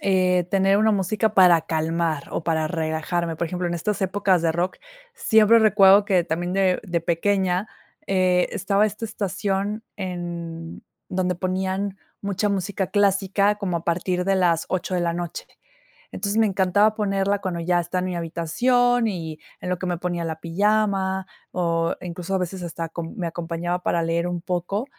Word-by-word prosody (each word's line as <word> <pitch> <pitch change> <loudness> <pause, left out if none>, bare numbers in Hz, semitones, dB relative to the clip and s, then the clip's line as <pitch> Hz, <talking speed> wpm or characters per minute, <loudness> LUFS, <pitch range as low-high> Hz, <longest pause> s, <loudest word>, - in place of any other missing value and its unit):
eh, 185 -2 +2
tener 195 0 +3
una 220 +1 +3
música 210 +2 0
para 180 -3 +6
calmar 160 -1 -1
o - - -3
para 160 -2 0
relajarme, 165 0 -2
por 170 +1 -2
ejemplo, 180 0 -2
en 175 - -2
estas 205 +5 -2
épocas 190 -2 +1
de 165 -1 +2
rock, 175 +3 -1 0.4
siempre 220 +1 +5
recuerdo 205 -2 +6
que 190 -4 +2
también 175 +2 -2
de 190 -1 +2
de 170 -3 -1
pequeña, 185 +3 0 0.4
eh, 185 -2 +2
estaba 205 +1 +2
esta 215 +2 -5
estación 200 +1 -2
en 170 -3 -6 0.2
donde 180 -1 0
ponían 190 +2 -2 0.2
mucha 200 +1 -1
música 195 0 -1
clásica 200 0 +2
como 185 -5 -2
a 165 - -13
partir 180 +1 0
de 195 0 +2
las 170 -3 +2
8 185 0 -2
de 180 - +1
la 170 -1 0
noche, 175 -1 -5 0.7
entonces, 200 +2 -2
me 225 - +5
encantaba 200 +2 +3
ponerla 200 -1 0
cuando 180 -3 -3
ya 175 +1 +1
estaba 175 +2 -2
en 180 - -2
mi 185 -1 -3
habitación 235 +9 +1
y 160 -6 -5 0.2
en 180 - -4
lo 180 -1 -1
que 185 - -3
me 175 -1 -1
ponía 175 -1 -3
la 160 -1 -4
pijama 195 +1 +1 0.3
o 165 -2 0
incluso, 180 +2 -4
a - - +3
veces, 180 0 -4
hasta 165 -1 -5
com 165 0 -6
me 180 - -2
acompañaba 170 +1 -3
para 170 -1 0
leer 165 +1 0
un 175 -1 -3
poco, 180 +6 -2
185 Hz, 175 wpm, -23 LUFS, 170-200 Hz, 0.7 s, para